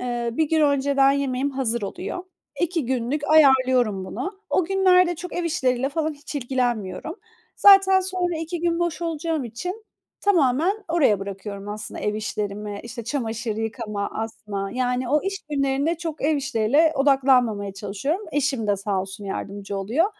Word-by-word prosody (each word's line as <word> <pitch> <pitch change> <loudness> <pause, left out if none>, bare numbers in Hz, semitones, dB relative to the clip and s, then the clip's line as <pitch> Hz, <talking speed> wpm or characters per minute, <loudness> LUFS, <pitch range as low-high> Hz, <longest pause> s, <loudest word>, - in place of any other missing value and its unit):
eee, 240 -1 -2
1 310 +5 0
gün 320 0 +2
önceden 280 -1 +3
yemeğim 275 0 -1
hazır 240 -4 -1
oluyor. 360 - -5 0.4
2 335 -6 0
günlük 260 +3 -1
ayarlıyorum 260 -9 +4
bunu. 255 - -4 0.2
O 370 - +2
günlerde 365 -1 +4
çok 350 +2 -8
ev 350 - -2
işleriyle 260 -5 0
falan 310 +2 -1
hiç 290 +1 -10
ilgilenmiyorum. 245 - -2 0.4
Zaten 390 -1 +7
sonra 365 -2 -2
2 330 +1 -4
gün 340 0 +1
boş 345 0 -1
olacağım 325 -3 -2
için 360 - -6 0.4
tamamen 355 - +2
oraya 300 - +3
bırakıyorum 200 +1 -6
aslında 210 0 -6
ev 210 0 -1
işlerimi. 210 -1 -4
İşte, 235 0 -7
çamaşır 230 -3 -3
yıkama, 220 -2 -3
asma, 210 -3 -4
yani, 250 0 -1
o 300 +2 +2
iş 390 0 -2
günlerinde 280 +3 +1
çok 325 -4 -5
ev 305 +1 +2
işleriyle 275 +4 +2
odaklanmamaya 255 -8 +3
çalışıyorum. 275 - -3
Eşim 275 -6 0
de 205 -1 +2
sağ 200 -1 -1
olsun 190 +2 -7
yardımcı 200 0 -5
oluyor. 230 - +1
265 Hz, 150 wpm, -23 LUFS, 220-320 Hz, 0.4 s, Zaten